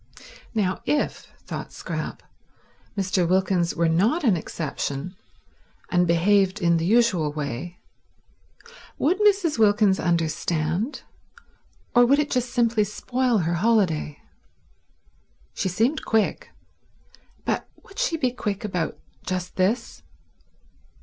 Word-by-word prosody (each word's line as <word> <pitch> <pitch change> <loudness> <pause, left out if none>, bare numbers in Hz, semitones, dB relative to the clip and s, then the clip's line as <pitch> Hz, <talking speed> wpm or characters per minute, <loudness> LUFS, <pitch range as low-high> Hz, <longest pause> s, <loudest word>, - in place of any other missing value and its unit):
Now 190 -4 0
if, 295 - -1 0.2
thought - - -6
Scrap, - - -5 0.7
Mr. 185 -2 +1
Wilkins 185 -2 +1
were 170 0 +2
not 210 - +2
an 220 -8 +4
exception 155 +1 -4 0.8
and 180 -1 +3
behaved 190 +4 +3
in 170 -2 +3
the 165 - -1
usual 200 -9 +3
way, 150 +4 -5 1.2
would 355 +7 +1
Mrs. 395 - +3
Wilkins 205 -2 +4
understand, 170 - -1 0.9
or 245 - +6
would 270 +4 +4
it 295 0 0
just 250 -1 0
simply 230 -3 +2
spoil 245 +4 0
her 170 - 0
holiday? 175 -7 +1 1.3
She 190 - -1
seemed 230 - 0
quick, 220 -1 0 1.0
but - - -2
would 390 - -11
she - - +1
be 255 -5 +1
quick 210 -5 -3
about 180 -5 -2 0.3
just 185 -1 -4
this? 195 - 0
195 Hz, 110 wpm, -24 LUFS, 170-240 Hz, 1.3 s, or